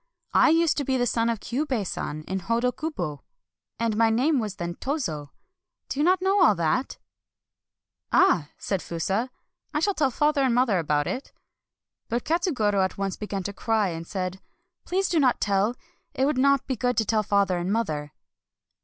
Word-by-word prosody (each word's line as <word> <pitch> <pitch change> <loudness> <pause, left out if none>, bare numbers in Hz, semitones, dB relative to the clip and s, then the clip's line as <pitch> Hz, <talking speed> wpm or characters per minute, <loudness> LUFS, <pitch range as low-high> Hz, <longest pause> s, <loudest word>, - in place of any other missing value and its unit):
" - - -41
I - - +6
used 330 0 +3
to 285 - 0
be 265 -1 0
the 245 - +1
son 230 0 +1
of 230 -2 -1
Kyubei 255 -4 -2
San 155 -3 -4
of 190 0 -2
Hodo 235 +5 +1
kubo, 175 - -4 0.6
and 230 -2 0
my 225 +1 +4
name 260 +6 +2
was 210 -4 -3
then 175 -2 -4
Tozo 170 - -3 0.3
— - - -60
do 275 - -3
you - - +3
not 370 +2 +3
know 385 0 +4
all 215 - +5
that? 170 +11 0 0.4
" - - -65
" - - -60
Ah! 175 - +4
" - - -44
said 195 - +1
Fusa, 195 +9 -2 0.2
" - - -48
I - - +3
shall 405 +5 +1
tell 290 -7 +2
father 295 +3 +1
and 260 -3 +2
mother 240 -7 +3
about 150 -2 +1
it." 260 - -4 0.8
But 235 +1 -2
Katsugoro 260 - +1
at 190 - -2
once 195 -1 -2
began 200 -2 -4
to 200 - -4
cry, 215 -1 0
and 165 -1 -6
said: 185 -1 -4
— - - -47
" - - -58
Please 380 +2 +1
do 335 - +1
not 260 -4 +3
tell! 205 +3 +1 0.2
— - - -45
it 265 - +2
would 285 -2 +1
not 275 0 +3
be 265 - -2
good 245 +2 -1
to 220 - +2
tell 215 +1 +2
father 200 -3 +1
and 175 +3 -2
mother." 155 -10 -1
230 Hz, 215 wpm, -25 LUFS, 190-275 Hz, 0.8 s, I